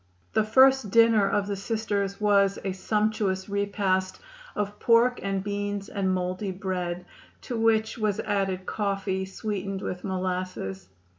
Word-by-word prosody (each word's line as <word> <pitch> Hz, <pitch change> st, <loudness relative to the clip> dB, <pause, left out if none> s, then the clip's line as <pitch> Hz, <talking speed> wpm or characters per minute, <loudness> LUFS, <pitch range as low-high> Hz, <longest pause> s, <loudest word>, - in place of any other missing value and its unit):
The 220 Hz, -, +3 dB
first 260 Hz, +1 st, +5 dB
dinner 225 Hz, -2 st, +5 dB
of 205 Hz, -1 st, +1 dB
the 200 Hz, 0 st, -2 dB
Sisters 200 Hz, -1 st, -2 dB
was 200 Hz, -2 st, +3 dB
a 195 Hz, -, 0 dB
"sumptuous 205 Hz, -1 st, 0 dB
repast" 200 Hz, -2 st, 0 dB, 0.4 s
of 205 Hz, 0 st, -3 dB
pork 235 Hz, +2 st, +4 dB
and 195 Hz, -1 st, -2 dB
beans 205 Hz, 0 st, -3 dB
and 195 Hz, -2 st, -1 dB
mouldy 185 Hz, +2 st, -2 dB
bread, 180 Hz, -2 st, -3 dB, 0.4 s
to 245 Hz, -, -5 dB
which 225 Hz, 0 st, +1 dB
was 210 Hz, -2 st, 0 dB
added 195 Hz, -2 st, -1 dB
coffee 195 Hz, -2 st, -1 dB
sweetened 195 Hz, 0 st, -4 dB
with 180 Hz, 0 st, -4 dB
molasses. 185 Hz, -, -3 dB
200 Hz, 135 wpm, -26 LUFS, 190-215 Hz, 0.4 s, first